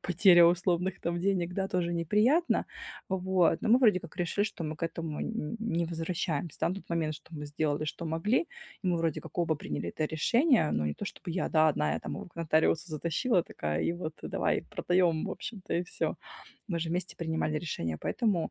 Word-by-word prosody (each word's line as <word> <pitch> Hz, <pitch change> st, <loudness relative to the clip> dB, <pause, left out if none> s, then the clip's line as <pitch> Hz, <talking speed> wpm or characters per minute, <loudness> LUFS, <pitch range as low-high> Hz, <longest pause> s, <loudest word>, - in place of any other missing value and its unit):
потеря 180 Hz, 0 st, +6 dB
условных 180 Hz, +2 st, +2 dB
там 170 Hz, 0 st, -1 dB
денег, 180 Hz, -2 st, 0 dB
да, 190 Hz, 0 st, 0 dB
тоже 175 Hz, -1 st, 0 dB
неприятно. 210 Hz, -, +2 dB, 0.4 s
Вот. 185 Hz, -3 st, +2 dB
Но -, -, 0 dB
мы, 240 Hz, -, +7 dB
вроде 215 Hz, -8 st, +5 dB
как, 165 Hz, -1 st, -12 dB
решили, 180 Hz, +3 st, 0 dB
что 185 Hz, -5 st, -4 dB
мы 155 Hz, 0 st, -4 dB
к -, -, -16 dB
этому 165 Hz, -2 st, -5 dB
н -, -, -2 dB, 0.3 s
н -, -, -3 dB
не 170 Hz, -7 st, 0 dB
возвращаемся, 165 Hz, -1 st, -3 dB
да. -, -, +2 dB
На 185 Hz, -, -1 dB
тот 195 Hz, -, -11 dB
момент, 160 Hz, -2 st, 0 dB
что 155 Hz, +2 st, -13 dB
мы 150 Hz, -1 st, -5 dB
сделали, 145 Hz, 0 st, -1 dB
что 155 Hz, +2 st, -5 dB
могли. 165 Hz, -, +1 dB, 0.4 s
И -, -, -3 dB
мы 175 Hz, -, +2 dB
вроде 165 Hz, -2 st, 0 dB
как -, -, -11 dB
оба 165 Hz, -2 st, +2 dB
приняли 85 Hz, -, -4 dB
это 155 Hz, -, -1 dB
решение, 230 Hz, -, +3 dB
но 75 Hz, -, 0 dB
не 75 Hz, -, -2 dB
то -, -, -6 dB
чтобы 170 Hz, -, -7 dB
я, 185 Hz, -, -1 dB
да, 155 Hz, -1 st, +4 dB
одна 75 Hz, -, +1 dB
я -, -, -2 dB
там -, -, -5 dB
его -, -, -7 dB
к -, -, -19 dB
нотариусу 160 Hz, +1 st, +2 dB
затащила 170 Hz, -, +1 dB
такая 75 Hz, +1 st, -3 dB
и -, -, +1 dB
вот, 170 Hz, -2 st, -5 dB
э: -, -, -4 dB
давай, -, -, 0 dB
продаем, 175 Hz, -3 st, +2 dB
в -, -, -3 dB
общем-то 205 Hz, -6 st, -6 dB
и 175 Hz, -, +1 dB
всё. 175 Hz, -, -2 dB, 0.5 s
Мы 170 Hz, -3 st, -1 dB
же 165 Hz, -, -2 dB
вместе 180 Hz, +1 st, -2 dB
принимали 160 Hz, -2 st, -1 dB
решение, 85 Hz, -, -3 dB
поэтому 200 Hz, -, 0 dB
170 Hz, 215 wpm, -30 LUFS, 155-185 Hz, 0.5 s, мы